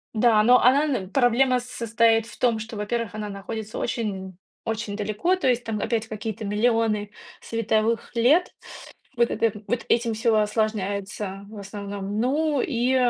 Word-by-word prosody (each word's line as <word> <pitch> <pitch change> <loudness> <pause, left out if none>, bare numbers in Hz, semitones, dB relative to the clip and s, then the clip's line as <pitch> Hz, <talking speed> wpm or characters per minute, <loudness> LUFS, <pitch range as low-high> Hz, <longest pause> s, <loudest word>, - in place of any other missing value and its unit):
Да, 220 -1 +4
но 250 +2 +6
она 275 +4 +5
н 250 -11 -2
проблема 250 +1 +3
состоит 230 -2 +1
в - - -13
том, 235 -3 +2
что, 225 +1 -7
во-первых, 220 +1 -2
она 210 -1 -4
находится 215 +2 -6
очень, 190 -6 -3 0.3
очень 220 -2 -3
далеко, 215 - 0
то 370 - -1
есть 245 -1 +1
там 225 -2 -3
опять 225 +1 -1
какие-то 220 0 -5
миллионы 215 0 +1 0.3
световых 225 0 0
лет. 275 +10 +3 0.6
Вот 235 0 +3
это 215 -2 0
вот 245 - -1
этим 230 -1 +2
всё 225 0 +2
осложняется, 205 -2 -1
в 215 - -10
основном. 200 0 -5
Ну 285 +3 +1
и 250 -1 +1
225 Hz, 150 wpm, -24 LUFS, 210-240 Hz, 0.6 s, но